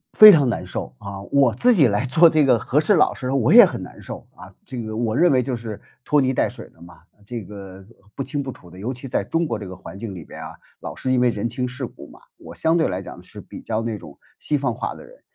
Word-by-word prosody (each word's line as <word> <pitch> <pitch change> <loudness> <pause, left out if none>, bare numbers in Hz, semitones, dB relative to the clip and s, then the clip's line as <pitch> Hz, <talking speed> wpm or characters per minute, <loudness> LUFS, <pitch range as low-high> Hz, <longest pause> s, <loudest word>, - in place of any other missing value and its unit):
非 215 -1 +11
常 145 -7 +4
难 115 - -2
受， 60 - -6
啊， 100 0 -8
我 135 -1 +2
自 245 - +4
己 150 - +5
来 105 +4 0
做 165 +5 +5
这 155 -3 +3
个 125 -3 +4
和 135 +6 0
事 155 +7 +3
佬 160 - +3
时 130 -1 -5
我 130 - +2
也 240 -2 +10
很 100 - -5
难 - - -12
受 - - -9
啊。 90 +2 -13 0.2
这 125 -4 -6
个 110 -1 -6
我 110 -1 -1
认 175 +1 +4
为 130 -2 +3
就 130 -3 -3
是 110 -3 -8 0.2
拖 150 -1 +3
泥 130 0 +1
带 - - +1
水 - - -11
的 80 - -25
嘛， 85 +1 -15 0.2
这 115 -1 -6
个 95 -1 -11 0.3
不 135 - -3
清 140 +2 -3
不 135 - -6
楚 90 -8 -11
的。 90 +2 -13
尤 120 +6 -3
其 125 +1 -9
在 100 - -1
中 165 +8 0
国 115 -7 -3
这 100 - -7
个 95 - -8
环 95 +1 -11
境 105 -4 -6
里 85 - -8
边 - - -11
啊， - - -8 0.3
老 - - -7
是 130 - -3
因 125 - +3
为 125 - +3
人 115 0 -1
情 125 +1 -3
世 125 +1 -5
故 - - -12
嘛， - - -17 0.2
我 - - -12
相 160 +1 +1
对 165 - +2
来 95 0 -3
讲 95 - -10
是 - - -12
比 - - -11
较 110 0 -2
那 115 -2 -3
种 - - -13 0.2
西 150 - -1
方 140 - -1
化 - - -5
的 - - -12
人。 - - -18
125 Hz, 305 characters per minute, -22 LUFS, 105-140 Hz, 0.3 s, 非